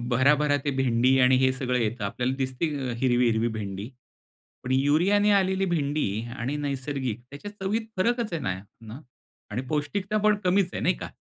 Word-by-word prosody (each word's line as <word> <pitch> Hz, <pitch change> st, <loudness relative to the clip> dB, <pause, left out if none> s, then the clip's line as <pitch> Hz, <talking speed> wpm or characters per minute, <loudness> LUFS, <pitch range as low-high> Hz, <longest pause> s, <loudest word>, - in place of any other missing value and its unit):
भराभरा 145 Hz, +4 st, +3 dB
ते 145 Hz, -, +1 dB
भेंडी 130 Hz, +1 st, +3 dB
आणि 130 Hz, 0 st, +5 dB
हे 130 Hz, 0 st, +3 dB
सगळं 125 Hz, -1 st, -1 dB
येतं, 115 Hz, -1 st, -1 dB
आपल्याला 125 Hz, +6 st, -1 dB
दिसते 130 Hz, +3 st, -1 dB, 0.3 s
हिरवी, 125 Hz, -2 st, +3 dB
हिरवी 115 Hz, +1 st, +1 dB
भेंडी. 100 Hz, +2 st, -5 dB, 0.7 s
पण 125 Hz, -, -4 dB
युरियाने 165 Hz, +10 st, +3 dB
आलेली 190 Hz, 0 st, 0 dB
भेंडी 145 Hz, 0 st, 0 dB, 0.3 s
आणि 130 Hz, +5 st, -2 dB
नैसर्गिक 135 Hz, -4 st, -3 dB
त्याच्या 145 Hz, +9 st, -8 dB
चवीत 205 Hz, +2 st, -2 dB, 0.2 s
फरकच 230 Hz, +1 st, 0 dB
आहे 165 Hz, -, -2 dB, 0.4 s
ना 115 Hz, +3 st, -10 dB, 0.5 s
आणि 115 Hz, +4 st, -2 dB
पौष्टिकता 185 Hz, +8 st, -1 dB
पण 210 Hz, 0 st, +5 dB
कमीच 185 Hz, 0 st, +2 dB
आहे -, -, -3 dB
नाही 180 Hz, +1 st, +2 dB
का? -, -, -7 dB
140 Hz, 160 wpm, -26 LUFS, 125-180 Hz, 0.7 s, आणि